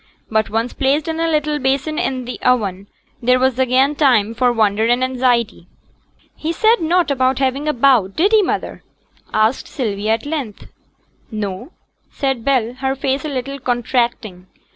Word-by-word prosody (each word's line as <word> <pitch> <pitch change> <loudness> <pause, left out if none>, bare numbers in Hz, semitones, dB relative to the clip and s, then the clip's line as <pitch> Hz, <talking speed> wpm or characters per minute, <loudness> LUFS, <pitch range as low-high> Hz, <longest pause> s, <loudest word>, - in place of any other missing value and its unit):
But 220 -1 +1
once 225 +3 -2
placed 285 +3 0
in 325 0 -3
a 330 - +1
little 300 -1 0
basin 275 +4 -1
in 260 -7 -2
the 250 - -7
oven, 200 -6 0 0.3
there 250 +1 +3
was 260 0 +1
again 260 +2 +3
time 245 -8 +2
for 245 +1 +2
wonder 215 -2 +1
and 245 +2 +2
anxiety. 250 -3 0 0.7
'He 315 - -3
said 440 +4 +2
nought 335 0 +1
about 260 -1 +1
having 275 +2 -1
a - - +3
bout, 235 -7 +3
did 390 +6 +2
he, 435 -1 +5
mother?' 370 - -3 0.5
asked 220 +4 +1
Sylvia 215 -4 -2
at 225 - -3
length. 285 -9 -5 0.6
'No,' 205 - -5 0.4
said 270 -4 -2
Bell, 245 -3 +1
her 265 0 -1
face 270 +1 -2
a - - -3
little 275 0 -4
contracting. 240 -6 -2
255 Hz, 165 wpm, -18 LUFS, 230-280 Hz, 0.7 s, he